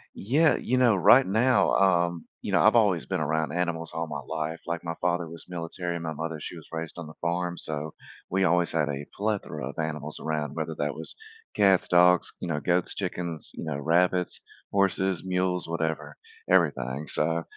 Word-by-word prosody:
Yeah, 145 +9 +3
you 130 - 0
know, 120 -4 +5
right 120 +8 +7
now, 120 +6 +3
um 85 -3 +2 0.2
You - - -4
know, - - +4
I've - - +5
always - - +3
been - - -2
around 80 +1 0
animals 85 -2 -2
all 80 +1 -2
my 75 -1 -4
life. 80 +1 -3
Like, 85 -1 -3
my 85 -1 -4
father 85 -1 0
was 85 0 -10
military. 85 0 -4
My 80 -1 -4
mother, 80 +1 -4
she 85 - -7
was 80 - -12
raised 80 0 -4
on 85 -3 -6
the 80 - -10
farm, 85 +1 -1
so 75 0 -5 0.4
we 95 +1 +1
always 90 -1 +2
had 75 -2 +1
a 70 0 -4
plethora 100 - -2
of - - -8
animals 75 -1 -4
around, 75 -2 -2
whether 80 0 -3
that 75 0 -1
was 80 - -7 0.4
cats, 95 -3 +4
dogs, 90 0 +5
you - - -3
know, 75 -2 0
goats, 90 +2 0
chickens, 85 -5 -4
you - - -7
know, 75 -3 -3
rabbits, 90 +4 +1 0.3
horses, 95 -2 +1
mules, 90 -1 0
whatever, 80 -3 -3 0.3
everything. 75 -5 +2
So, 80 +2 0
85 Hz, 190 wpm, -27 LUFS, 80-90 Hz, 0.4 s, right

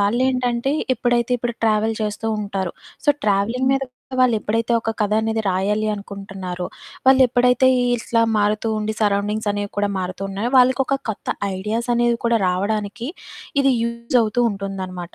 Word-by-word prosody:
వాళ్ళేంటంటే 245 +4 +1 0.2
ఎప్పుడైతే 240 0 +1
ఇప్పుడు 240 0 -3
ట్రావెల్ 220 0 +2
చేస్తూ 210 +1 -3
ఉంటారు. 195 -3 -3 0.3
సో 295 - -3 0.2
ట్రావెలింగ్ 215 +6 +1
మీద 270 - +1
కూడా 260 +1 -10
వాళ్ళెప్పుడైతే 230 -1 +1
ఒక 225 - -2
కథ 210 0 +1
అనేది 220 0 -1
రాయాలి 205 +3 0
అనుకుంటున్నారో, 195 -3 -6 0.4
వాళ్ళెప్పుడైతే 250 -1 +5 0.3
ఇట్లా 230 0 +1
మారుతూ 210 +2 +1
ఉండి, 215 +1 -2
సరౌండింగ్స్ 210 +1 0
అనేవి 205 0 -3
కూడా 205 0 +1
మారుతున్నాయో, 195 +4 -3
వాళ్ళకొక 260 +2 +4
కొత్త 215 - -5 0.3
ఐడియాస్ 225 +5 -2
అనేవి 240 0 +2
కూడా 235 0 +3
రావడానికి 210 +5 -2 0.5
ఇది 275 0 +4
యూజ్ 235 +1 -1
అవుతూ 225 +2 0
ఉంటుందన్నమాట. 190 -3 -6
220 Hz, 135 wpm, -21 LUFS, 200-240 Hz, 0.5 s, వాళ్ళెప్పుడైతే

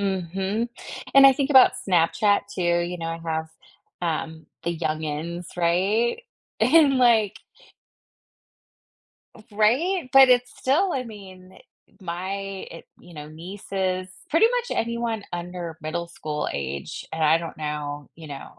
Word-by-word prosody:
Mhm, 195 +3 -2 0.5
and 275 0 +9
I 270 - +8
think 275 +2 -1
about 265 -2 +8
Snapchat, 190 +3 +3
too, 185 - -2 0.3
you 180 - -5
know, 165 - -4
I 165 0 -4
have, 160 -1 -3 0.5
um, 160 -2 -3 0.2
the 170 0 -2
youngins, 160 +2 -4
right? 195 - +1 0.4
And, 295 -5 +5
like 225 -4 +3 2.0
F 215 - -16
Right? 255 - +2
But 270 -1 +8
it's 250 0 +3
still, 325 +8 +1
I 260 - -1
mean, 190 -4 -12 0.4
e - - -30
My 185 +1 -4 0.4
it 165 - -11 0.2
you 175 -1 -15
know, 150 -1 -8
nieces 185 +2 -4 0.2
pretty 330 +8 +5
much - - -1
anyone 235 -2 -2
under 175 -2 -6
middle 170 +2 -3
school 150 -3 -4
age, 70 0 -5
and 160 0 -3
I 155 +2 +5
don't 165 -1 -7
know, 150 -1 -4
you 160 -2 -11
know, 140 -1 -10
185 Hz, 140 wpm, -24 LUFS, 160-230 Hz, 2.0 s, and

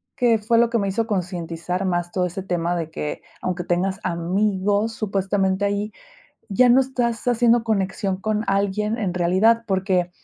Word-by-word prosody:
que 240 -4 +3
fue 230 +2 +1
lo 235 0 +4
que 235 - +1
me 200 -3 0
hizo 225 +4 0
concientizar 180 -3 -3
más 175 -1 -1
todo 180 -1 +1
ese 180 +2 -5
tema 175 -2 -1
de 165 -2 -3
que 150 - -4 0.2
aunque 180 -1 -3
tengas 185 +2 0
amigos 200 +5 0
supuestamente 195 -2 0
ahí, 205 +1 -1 0.6
ya 245 +6 +4
no 245 +2 +6
estás 245 -3 -2
haciendo 240 -1 +3
conexión 195 -2 -1
con 215 +1 -1
alguien 200 +3 0
en 195 -6 -2
realidad 190 +7 +3
porque 185 -2 0
195 Hz, 165 wpm, -22 LUFS, 180-225 Hz, 0.6 s, no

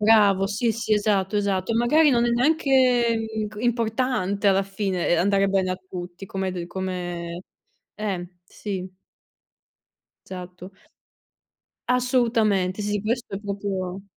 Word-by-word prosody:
Bravo. 205 -3 +5
Sì, 215 +4 0
sì, 220 0 -2
esatto, 205 -1 +1
esatto. 200 0 0
E - - -1
magari 290 +7 +4
non 240 -2 +3
è 240 - +2
neanche 250 -3 +3 0.2
inc 215 -1 -4
importante 225 -3 0
alla 195 0 +4
fine, 195 -2 -2
ehm, 175 - +3
andare 195 +2 +3
bene 190 -1 +1
a - - -4
tutti, 180 0 -8
come 190 0 -3
hai 185 - -2
de 175 -2 -5
come 175 -2 -4 0.5
eh, 195 -5 -3 0.2
sì. 190 0 -5 1.4
Esatto. 180 0 -9 1.2
Assolutamente 225 -7 +2
sì, 205 0 -1
questo 225 0 -2
è 195 - -5
proprio 195 -2 -4
200 Hz, 130 wpm, -24 LUFS, 185-230 Hz, 1.4 s, Bravo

